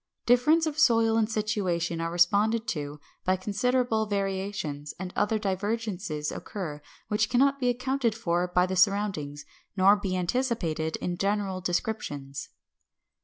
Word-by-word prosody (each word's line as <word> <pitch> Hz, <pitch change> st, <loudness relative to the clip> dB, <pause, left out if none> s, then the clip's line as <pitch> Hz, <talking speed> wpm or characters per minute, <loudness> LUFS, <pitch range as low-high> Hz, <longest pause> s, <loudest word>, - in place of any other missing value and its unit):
Difference 300 Hz, +7 st, +4 dB
of 310 Hz, -1 st, -3 dB
soil 230 Hz, -6 st, +4 dB
and 225 Hz, -1 st, +2 dB
situation 185 Hz, -6 st, -1 dB
are 165 Hz, -, -1 dB
responded 205 Hz, +6 st, +3 dB
to 150 Hz, -2 st, -4 dB, 0.2 s
by 185 Hz, -, +2 dB
considerable 220 Hz, +3 st, 0 dB
variations, 195 Hz, -7 st, -3 dB
and 180 Hz, 0 st, -6 dB
other 210 Hz, +2 st, +1 dB
divergences 195 Hz, -6 st, -2 dB
occur 155 Hz, -8 st, -6 dB, 0.3 s
which 210 Hz, -, +1 dB
cannot 275 Hz, +2 st, +3 dB
be 250 Hz, -2 st, +2 dB
accounted 250 Hz, -1 st, 0 dB
for 175 Hz, -5 st, 0 dB
by 180 Hz, 0 st, +3 dB
the 185 Hz, 0 st, -3 dB
surroundings, 180 Hz, -7 st, +1 dB, 0.3 s
nor 195 Hz, +2 st, +6 dB
be 195 Hz, -3 st, -2 dB
anticipated 175 Hz, -6 st, -1 dB
in 175 Hz, -1 st, -3 dB
general 195 Hz, -1 st, -1 dB
descriptions. 170 Hz, -7 st, -3 dB
200 Hz, 130 wpm, -27 LUFS, 175-225 Hz, 0.3 s, nor